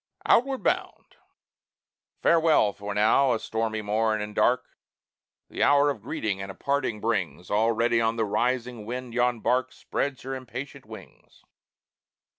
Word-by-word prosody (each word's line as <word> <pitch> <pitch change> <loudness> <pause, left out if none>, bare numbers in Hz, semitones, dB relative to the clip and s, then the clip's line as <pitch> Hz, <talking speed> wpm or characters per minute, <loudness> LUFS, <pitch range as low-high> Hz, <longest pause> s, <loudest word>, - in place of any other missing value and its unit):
OUTWARD 265 +2 +3
BOUND - - -2 1.1
Farewell! 160 -11 +4
for 100 0 -6
now 115 +5 +4
a 115 - -1
stormy 110 -1 -2
morn 110 +1 +1
and 105 0 -5
dark - - +2 0.8
The - - -6
hour 145 0 +5
of 125 - -8
greeting 110 -6 -3
and 95 - -6
of 95 - -9
parting 140 -6 -1
brings; 95 -5 -2
Already 115 +2 +2
on 115 0 +1
the 115 -1 0
rising 120 0 -1
wind 125 0 -5
yon 120 -1 +1
bark 130 +2 +1
Spreads 140 -2 -3
her 135 +1 -5
impatient 130 +1 -7
wings. 110 -3 -14
115 Hz, 140 wpm, -26 LUFS, 110-130 Hz, 1.1 s, hour